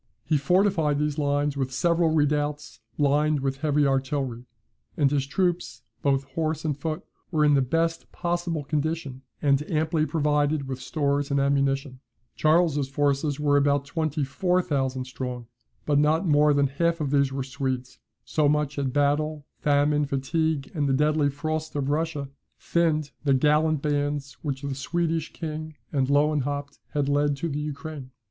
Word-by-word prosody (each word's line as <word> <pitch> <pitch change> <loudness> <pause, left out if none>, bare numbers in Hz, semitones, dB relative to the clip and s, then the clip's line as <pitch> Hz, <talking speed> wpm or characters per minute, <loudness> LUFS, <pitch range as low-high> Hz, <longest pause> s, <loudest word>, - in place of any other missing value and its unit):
He 155 - +1
fortified 165 -1 +2
these 150 0 -1
lines 145 0 +1
with 135 -2 -2
several 170 +4 +2
redoubts, 145 -5 0 0.2
lined 150 +1 +2
with 135 0 -1
heavy 150 0 +2
artillery; 135 -3 -1 0.5
and 140 -3 +3
his 140 -2 0
troops, 175 -4 -1 0.2
both 135 -1 +2
horse 160 +1 -2
and 150 -3 0
foot, 155 +4 -4 0.3
were 155 -3 +2
in 145 - +5
the 140 - +4
best 165 +5 -1
possible 175 -3 -2
condition, 150 -2 -2 0.2
and 140 -1 +3
amply 155 0 +1
provided 150 -2 +1
with 130 -1 -5
stores 145 -2 0
and 140 0 +1
ammunition. 140 -1 0 0.4
Charles's 155 -3 +2
forces 140 +1 0
were 145 -1 +3
about 140 0 +2
twenty 155 0 -1
four 180 +7 +1
thousand 135 -5 -1
strong. 125 -1 -5 0.4
But 145 -1 +3
not 155 +5 +2
more 150 -2 +4
than 140 0 +3
half 165 +5 0
of 145 -3 -2
these 140 -2 +3
were 135 0 -2
Swedes; 130 -1 -4 0.3
so 150 -2 +2
much 150 -1 0
had 135 -2 -1
battle, 145 +1 0
famine, 145 0 +2
fatigue, 140 +2 -1
and 145 -5 0
the - - +2
deadly 150 +1 +2
frosts 155 +2 -3
of 140 -1 -1
Russia, 150 -2 -1 0.3
thinned 155 -4 +1
the 140 -2 +3
gallant 150 +2 +2
bands 145 -1 -1
which 140 -2 -4
the 140 -1 -2
Swedish 165 +3 -1
king 155 -1 -6 0.2
and 135 -3 +1
Lewenhaupt 145 -1 0
had 145 -2 0
led 145 0 +2
to 170 - -2
the 145 0 -3
Ukraine. 150 -2 -6
145 Hz, 160 wpm, -26 LUFS, 140-155 Hz, 0.5 s, in